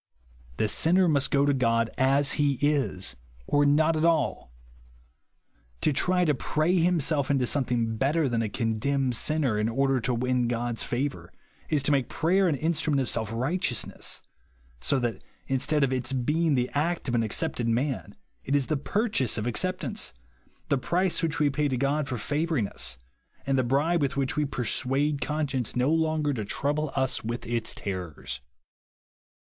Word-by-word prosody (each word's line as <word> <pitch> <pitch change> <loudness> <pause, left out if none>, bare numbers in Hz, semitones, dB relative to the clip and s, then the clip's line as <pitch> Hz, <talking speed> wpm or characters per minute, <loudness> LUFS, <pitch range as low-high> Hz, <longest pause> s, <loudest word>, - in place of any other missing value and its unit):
The 110 - +1
sinner 180 - +3
must 140 -4 +2
go 140 0 +3
to 145 - +3
God 115 -3 +1
as 135 +2 +3
he 145 -1 +2
is, 120 - 0 0.3
or 145 0 +3
not 155 +3 +3
ai 155 - 0
all. 150 - -1 1.3
To 150 - +2
try 180 +5 +2
to 150 - +3
pray 155 +7 +1
himself 160 -5 +1
into 135 -3 +2
something 120 -4 0
better 145 +5 +1
than 120 -2 0
a 110 - -1
condemned 125 +4 0
sinner, 135 -5 +1
in 105 +1 +1
order 135 +2 +1
to 120 +1 -1
win 125 0 +1
God's 120 0 -1
favour, 135 +3 -3 0.4
is 145 -3 +1
to 145 - +1
make 135 -3 +1
prayer 185 +4 +2
an 160 - +1
instrument 155 -1 0
of 130 - 0
self 110 -2 -1
right 135 +11 -1
eousness; 125 - -2 0.6
so 100 - +1
that, 120 -3 -2 0.2
instead 140 +3 +1
of 130 -1 +1
its 125 0 -2
being 150 +5 +1
the 125 -1 0
act 160 +3 -1
of 125 - -1
an 120 - +2
accepted 115 +2 -1
man, 120 -2 -1 0.3
it 140 - 0
is 140 -2 +2
the 155 - 0
purchase 145 - 0
of 105 - -2
acceptance,— 120 - -2 0.5
the 140 - +2
price 180 +6 0
which 160 -3 -1
we 145 -1 +2
pay 150 +2 0
to 130 -2 -1
God 140 +3 0
for 130 -3 -3
favouring 145 0 0
us, 65 -7 -3 0.5
and 135 - +1
the 130 - +2
bribe 145 +7 +1
with 140 -1 -1
which 135 -1 0
we 150 - +1
j^ersuade 135 +3 0
conscience 135 -3 -2
no 125 +4 +2
longer 155 -2 +1
to 110 -5 -3
trouble 145 +7 -1
us 130 -1 0
with 120 +2 -4
its 115 -1 -2
terrors. 75 -9 -5
135 Hz, 175 wpm, -27 LUFS, 120-150 Hz, 1.3 s, sinner